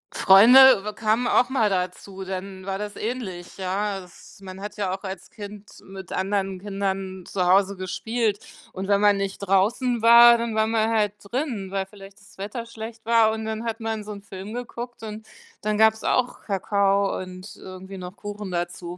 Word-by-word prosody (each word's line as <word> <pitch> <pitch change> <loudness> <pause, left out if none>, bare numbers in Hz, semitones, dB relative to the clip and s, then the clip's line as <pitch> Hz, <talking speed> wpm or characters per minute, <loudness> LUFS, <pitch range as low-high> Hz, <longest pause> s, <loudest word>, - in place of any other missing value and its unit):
Freunde, 235 +4 +8
äh, 210 - -3
kamen 225 +3 0
auch 245 - +3
mal 225 -6 +2
dazu, 190 +1 -3
dann 190 0 -6
war 195 0 -3
das 205 0 -6
ähnlich, 210 -7 -5
ja. 195 +1 -2
Es 180 - -16
man 190 0 -9
hat 205 +1 -7
ja 195 -3 -1
auch 190 - -7
als 190 -1 -7
Kind 205 -1 -10 0.2
mit 190 -1 -10
anderen 195 -1 -1
Kindern 195 -1 -4
zu 185 -2 -1
Hause 195 +2 +3
gespielt 205 +3 -2 0.3
und 190 +1 -5
wenn 200 0 +3
man 205 -1 +5
nicht 195 -1 -3
draußen 215 +5 +1
war, 235 +1 +8
dann 230 -1 -3
war 220 0 +3
man 220 0 +1
halt 210 -3 +1
drin, 230 -3 -3
weil 195 -1 -1
vielleicht 200 0 -15
das 190 - -20
Wetter 210 +4 -5
schlecht 225 0 -9
war 225 -1 +4
und 220 0 -4
dann 220 0 -4
hat 230 0 -3
man 220 -1 -3
so 210 - -8
'n 200 -1 -8
Film 200 +1 -9
geguckt 240 0 -7
und 215 0 -7 0.4
dann 210 0 -1
gab's 220 0 +4
auch 250 0 0
Kakao 200 0 +1
und 185 +2 -10
irgendwie 190 +1 -10
noch 180 +1 -8
Kuchen 205 -1 -7
dazu. 175 0 -4
200 Hz, 185 wpm, -24 LUFS, 190-220 Hz, 0.4 s, Freunde